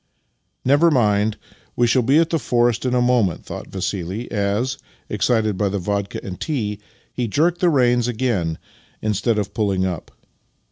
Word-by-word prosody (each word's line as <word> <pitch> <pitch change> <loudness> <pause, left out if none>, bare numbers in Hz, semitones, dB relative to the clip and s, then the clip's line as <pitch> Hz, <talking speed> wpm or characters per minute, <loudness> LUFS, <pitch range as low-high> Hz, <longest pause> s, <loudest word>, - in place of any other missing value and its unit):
" - - -50 0.2
Never 145 +6 +5
mind; 105 -6 +2 0.4
we 120 - +3
shall 125 +2 +3
be 135 +5 +3
at 165 0 +3
the 165 - +1
forest 120 -2 +1
in 125 - +1
a 125 - +3
moment," 120 -9 +1
thought - - -7
Vassili 95 +3 -4
as, 105 +5 -1 0.3
excited 110 -1 +1
by 100 - +2
the 100 - -2
vodka 100 +1 -2
and 90 -2 -7
tea, 105 -10 -2 0.3
he 120 -2 -2
jerked 165 - +1
the 180 - +5
reins 125 -5 +3
again 110 -10 -1 0.5
instead 110 +2 +1
of 100 -1 -2
pulling 100 -4 0
up. 90 -4 -4
110 Hz, 170 wpm, -21 LUFS, 100-125 Hz, 0.5 s, Never